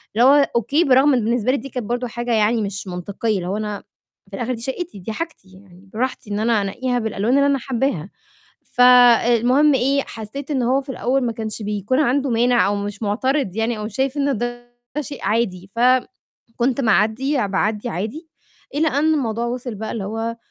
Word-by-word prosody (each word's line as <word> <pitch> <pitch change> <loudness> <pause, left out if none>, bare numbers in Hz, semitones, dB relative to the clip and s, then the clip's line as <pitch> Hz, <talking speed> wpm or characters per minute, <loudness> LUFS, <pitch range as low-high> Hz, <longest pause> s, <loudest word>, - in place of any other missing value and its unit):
اللي 235 +3 +5
هو 285 0 +5
أوكي، 270 +8 +2
برَغم 275 0 +4
إن 240 -4 +1
بالنسبة 235 +1 +1
لي 280 - +1
دي 275 +4 -8
كانت 250 -3 -5
برضه 245 +2 -2
حاجة 240 +1 -3
يعني 220 +1 +2
مش 200 -1 -4
مَنطقيّة، 200 +4 -2
اللي 175 - -4
هو 195 +3 -2
أنا 210 -2 -4 0.5
في 195 - -7
الآخر 245 +4 -2
دي 230 - -7
شَقّتي، 265 - -5
دي 190 +4 -6
حاجتي، 325 - -6
يعني 190 0 -18
براحتي 240 -2 -3
إن 205 - -1
أنا 225 -1 +2
أنقّيها 245 +5 -2
بالألوان 220 +2 0
اللي 280 - +4
أنا 280 -1 +2
حَبّاها. 235 - -2 0.6
فالمهم 245 +3 +5
إيه، 275 +2 +2
حسّيت 235 +6 -8
إن 265 -4 0
هو 255 +3 +2
في 275 - -15
الأول 265 +1 0
ما 235 - -1
كانش 220 -1 -5
بيكون 210 +6 -1
عنده 275 0 +1
مانع 240 +1 +3
أو 205 +1 0
مش 205 +1 -5
مُعترض 225 0 0
يعني 225 0 -1
أو 210 - -5
مش 215 +2 -7
شايف 265 +1 0
إن 280 -4 0
ده 240 +1 -6 0.2
شيء 285 -1 -7
عادي، 195 -4 -1
فم 255 +2 +5 0.6
كنت 255 +2 0
مَعدّية، 225 +4 +2
باعدّي 210 +4 -1
عادي، 230 - -5 0.5
إلى 315 +2 +2
أن 310 +2 +2
الموضوع 235 -5 -1
وِصل 245 -1 -4
بقى 220 +2 -5
اللي 220 - -4
هو 225 +3 -4
235 Hz, 195 wpm, -21 LUFS, 210-265 Hz, 0.6 s, اللي